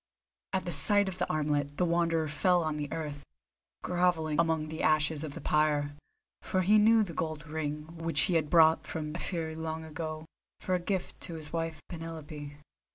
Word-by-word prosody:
At 190 - 0
the 175 - -2
sight 200 +7 +4
of 185 -1 -5
the 180 - -1
armlet 145 -1 0
the 180 - +2
Wanderer 165 -2 +1
fell 175 +4 +2
on 155 -1 -2
the 145 -1 -4
earth, 150 -3 -4 0.6
grovelling 175 -4 +1
among 160 -2 +1
the 160 0 -5
ashes 155 0 +2
of 150 -3 -6
the - - -7
pyre, 150 -1 +2 0.5
for 185 - 0
he 210 +4 +6
knew 220 +1 +6
the 175 -5 -6
gold 155 -1 -3
ring 150 -1 -3 0.2
which 165 -3 +1
he 185 - +2
had 160 -3 +1
brought 160 -1 +5
from 155 -1 -4
Ephyre 165 -3 -3
long 160 0 -4
ago, 155 0 -5 0.3
for 185 - -2
a 180 - +2
gift 185 +1 -3
to 170 - -7
his 155 -1 -9
wife 165 -2 -3
Penelope. 155 -3 -7
160 Hz, 185 wpm, -30 LUFS, 150-170 Hz, 0.6 s, he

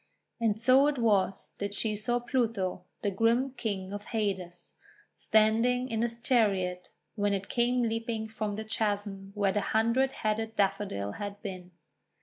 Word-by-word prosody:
And 220 -2 +1
so 260 +4 +5
it 295 -2 0
was 205 -5 +1
that 200 0 -3
she 215 +1 0
saw 230 +4 0
Pluto, 230 -7 -1 0.2
the 205 - +1
grim 230 +6 +2
King 200 -6 -4
of 205 0 -6
Hades, 190 -6 -3 0.4
standing 230 +4 +3
in 225 -1 -1
his 235 0 -2
chariot 195 -7 +1 0.2
when 205 -1 +1
it 195 0 -5
came 245 +1 +2
leaping 225 -1 -2
from 215 -1 -3
the 220 +1 -5
chasm 205 -3 -2
where 200 -2 +2
the 210 - 0
Hundred 230 +6 +2
Headed 220 0 -2
Daffodil 195 - 0
had 205 0 -5
been. 185 -3 -6
215 Hz, 150 wpm, -30 LUFS, 200-230 Hz, 0.4 s, so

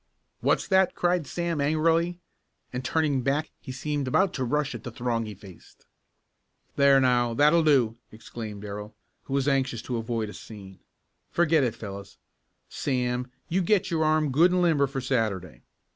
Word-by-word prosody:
"What's - - +1
that?" 190 -1 +3
cried 175 -4 +1
Sam 170 -3 -2
angrily, 165 +4 +2 0.6
and 125 +1 -3
turning 145 0 +1
back 140 +5 -1
he - - -8
seemed 145 +1 -3
about 190 +8 +2
to 130 - -2
rush 145 +3 0
at 115 -2 -8
the - - -5
throng 115 -1 -2
he 105 - -7
faced. 95 -2 -16 0.9
"There 140 -1 +5
now, 120 -2 +2
that'll 150 +6 +5
do!" 130 -8 +3
exclaimed 110 -2 -8
Darrell, 105 +1 -7 0.3
who 135 - -6
was 140 0 +1
anxious 135 -4 0
to 125 - -3
avoid 115 -1 -2
a - - -9
scene. 95 -4 -11 0.5
"Forget 165 -3 +3
it, 120 -3 -1
fellows. 100 -3 -9 0.5
Sam, 125 -2 -2 0.2
you 185 +3 +1
get 190 +1 +1
your 160 -1 +1
arm 155 -2 +2
good 165 +7 +5
and 180 0 +2
limber 150 -5 +3
for 135 0 -4
Saturday. 105 - -2
135 Hz, 165 wpm, -26 LUFS, 115-155 Hz, 0.9 s, There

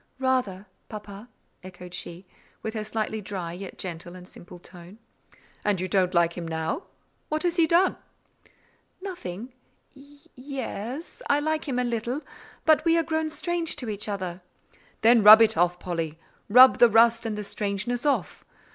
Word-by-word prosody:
"Rather, 255 -8 -1 0.2
papa," 210 +1 -9 0.3
echoed 180 -1 -11
she, 180 +1 -7 0.4
with 220 - -4
her 215 -2 -3
slightly 215 0 -3
dry, 185 -4 -5
yet 185 +1 -9
gentle 175 -1 -7
and 180 0 -12
simple 175 0 -13
tone. 175 +2 -14 0.7
"And 205 -3 +1
you 185 - -2
don't 185 -1 +1
like 170 0 +3
him 170 -2 -6
now? 160 - -3 0.4
What 310 0 -2
has 350 0 0
he 330 -2 +4
done?" 345 +4 +3 1.0
"Nothing. 250 - -7 0.4
Y—e—s, 280 - -8
I 285 - +4
like 310 +1 -2
him 260 -3 -2
a 250 - +1
little; 240 +3 -2 0.4
but 315 -1 +4
we 330 0 +3
are 330 - +2
grown 315 -1 -1
strange 340 +1 -3
to 250 -6 -5
each 210 0 -5
other." 185 -3 -4 0.6
"Then 230 +1 +6
rub 215 +2 +10
it 225 -1 +4
off, 175 0 +2
Polly; 165 -3 -4 0.3
rub 255 +4 +8
the 240 - +7
rust 230 +1 +4
and 215 -1 -3
the 210 - -4
strangeness 205 +4 -3
off. 290 -2 -1
220 Hz, 160 wpm, -26 LUFS, 185-275 Hz, 1.0 s, rub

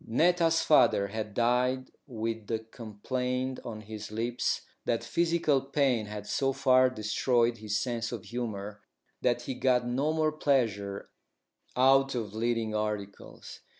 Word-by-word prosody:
Netta's 165 +5 +3
father 100 -9 +4
had 105 -1 -5
died 125 +2 +1 0.2
with 115 -3 -4
the 115 - 0
complaint 125 +4 -4
on 110 -2 -6
his 105 -1 -8
lips 115 +3 -1 0.2
that 115 - 0
physical 165 -5 +1
pain 135 -5 +1
had 105 0 -7
so 135 +4 0
far 130 -1 +4
destroyed 115 +1 +1
his 105 -1 -2
sense 120 -1 -2
of 120 - -5
humour 105 -2 -5 0.4
that 120 0 +1
he 130 - -3
got 125 -1 +2
no 135 +5 0
more 155 -1 +1
pleasure 110 -10 -1 0.6
out 135 +1 +4
of 110 -4 -3
leading 115 -1 -1
articles. 105 -2 -5
120 Hz, 135 wpm, -29 LUFS, 110-130 Hz, 0.6 s, father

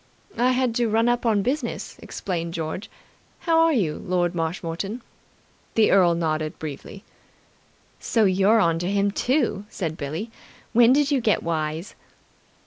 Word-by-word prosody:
"I 250 +1 +3
had 255 -2 +1
to 240 -2 +1
run 225 +2 +2
up 240 0 +1
on 210 -3 +2
business," 260 +1 -3
explained 170 -2 -4
George. 165 +4 -4 0.5
"How 330 -1 +2
are 330 0 +5
you, 185 - 0
Lord 180 -1 0
Marshmoreton?" 170 +6 -4 0.7
The 220 -1 +4
earl 180 -3 +5
nodded 155 -1 -2
briefly. 155 +6 -8 1.0
"So 225 -3 +1
you're 195 +4 +4
on 165 -5 +2
to 175 +2 -2
him, 200 0 +1
too?" 245 -3 0
said 165 -7 -4
Billie. 160 +10 -5 0.4
"When 240 +1 +6
did 285 +2 +3
you 275 -3 +2
get 220 -2 +1
wise?" 160 +2 -3
195 Hz, 145 wpm, -24 LUFS, 165-235 Hz, 1.0 s, When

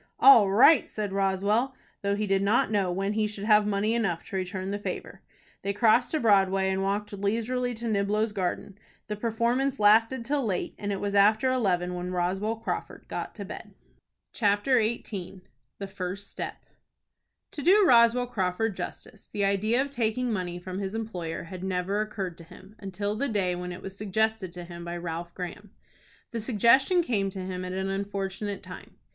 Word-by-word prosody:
"All 230 -7 +8
right!" 250 +9 +6
said 205 -2 -4
Roswell, 200 +6 +1 0.3
though 200 0 0
he 210 +1 -1
did 195 -1 +1
not 205 +1 +2
know 195 -4 +1
when 195 +3 -1
he 215 0 +1
should 210 -1 -6
have 210 -1 +4
money 210 +2 +1
enough 195 -8 -1
to - - -8
return 185 +1 -3
the 205 - -2
favor. - - -6 0.4
They 200 - -2
crossed 235 +3 +4
to 315 - 0
Broadway, 195 -4 +3
and 190 0 -1
walked 205 +2 -2
leisurely 230 +5 -1
to 235 +2 -6
Niblo's 210 +1 +1
Garden. 195 +1 -3 0.3
The 210 - -2
performance 235 +5 0
lasted 225 +4 +4
till 280 +1 0
late, 195 -6 -2
and 205 0 -3
it 195 - -2
was 200 0 -2
after 215 +5 +4
eleven 180 -8 0
when 180 0 -4
Roswell 185 +5 -1
Crawford 225 +1 -5
got - - -3
into - - -4
bed. - - -9 0.6
CHAPTER 215 +4 +2
XVIII. 195 -4 -4 0.4
THE 200 - -5
FIRST 195 +1 -5
STEP. - - -6 0.9
To 295 - -6
do 390 +6 +5
Roswell 240 -3 +5
Crawford 205 -2 -1
justice, 185 +3 -8
the 200 -1 0
idea 210 +5 +1
of 280 - -8
taking 240 -1 0
money 180 -3 -3
from 185 +1 -6
his 195 +1 -4
employer 180 -8 -4
had 180 +1 -8
never 190 +2 -1
occurred 195 -5 -4
to - - -10
him 185 +4 -15
until 205 +1 -3
the 280 +5 -1
day 195 -5 0
when 180 0 -5
it 180 - -8
was 195 0 -7
suggested 215 -1 -1
to 175 -1 -7
him 170 0 -9
by 170 0 -5
Ralph 170 0 -5
Graham. 180 +3 -7 0.6
The 230 -2 -3
suggestion 260 - +4
came 205 -9 0
to 190 -1 -6
him 185 -1 -4
at 180 0 -5
an 190 +1 -2
unfortunate 200 0 -4
time. - - -11
205 Hz, 185 wpm, -27 LUFS, 190-225 Hz, 0.9 s, All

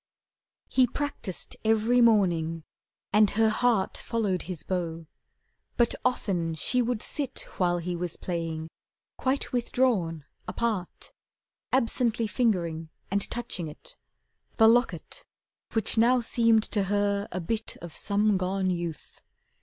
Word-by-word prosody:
He 255 -1 +4
practised 245 -8 -4
every 225 +3 +3
morning 170 -8 +3 0.5
and 210 0 +6
her 220 +2 +3
heart 220 -4 +1
Followed 210 -6 -1
his 180 -4 -4
bow. 165 -3 -3 0.7
But 235 -1 +3
often 180 -10 0
she 250 - +1
would 240 -2 -1
sit, 275 -3 -2 0.2
While 175 -1 +2
he 175 +1 -3
was 175 -1 -4
playing, 165 -2 -4 0.5
quite 265 +1 -1
withdrawn 225 - 0 0.2
apart, 195 -1 -3 0.6
Absently 235 -2 +2
fingering 175 -9 0 0.2
and 200 0 +1
touching 225 -8 -2
it, 150 - -8 0.6
The 225 - +6
locket, 240 +2 +1 0.5
which 225 0 +2
now 245 +3 +5
seemed 230 -2 +3
to 205 -2 +2
her 200 0 0
a 185 - -3
bit 215 +6 -3
Of 170 -3 -8
some 205 0 +2
gone 185 0 0
youth. 170 -4 -5
205 Hz, 120 wpm, -27 LUFS, 175-235 Hz, 0.7 s, and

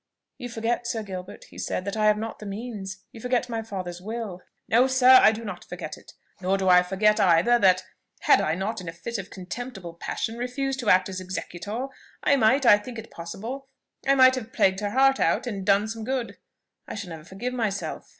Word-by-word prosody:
"You 245 -2 -6
forget, 235 +1 -2
Sir 225 -2 -2
Gilbert," 185 -2 -8
he - - -11
said, 185 - -3
"that 200 - -3
I 215 -1 +2
have 210 0 +4
not 225 +1 -5
the 215 - -9
means: 200 -3 -6
you 225 - -12
forget 250 0 0
my 225 -1 -2
father's 185 -5 -6
will." 215 -3 -5 0.3
"No, 245 +3 +4
sir; 260 0 +7
I - - +7
do 225 +1 -6
not 185 -4 -6
forget 175 -3 -7
it. - - -16 0.3
Nor 190 +1 +1
do 190 -1 -1
I 180 0 +8
forget 195 +4 +2
either 185 +7 +4
that, 185 -2 +4 0.4
had - - +5
I 155 - 0
not 200 +3 -3
in 175 - -6
a - - -7
fit 225 +7 -5
of 195 0 -7
contemptible 190 -1 -7
passion 225 +6 -4
refused 265 +2 -2
to 240 - -1
act 185 0 +5
as 185 -1 -5
executor, 190 +6 -5 0.4
I 280 - +4
might, 260 +2 +3
I 205 -3 +7
think 235 +3 -9
it 225 0 -9
possible, 220 +11 -7 0.4
I 275 - +5
might 260 -1 +7
have 235 -4 -5
plagued 190 0 +3
her 205 -1 -2
heart 270 +4 +4
out, - - +2
and 205 -5 -4
so - - -7
done 200 +1 +3
some 225 0 -5
good. 255 0 -3 0.5
I - - -6
shall 200 -4 -6
never 160 -1 -8
forgive 195 +9 -5
myself!" 215 -5 -3
215 Hz, 220 wpm, -25 LUFS, 190-240 Hz, 0.5 s, I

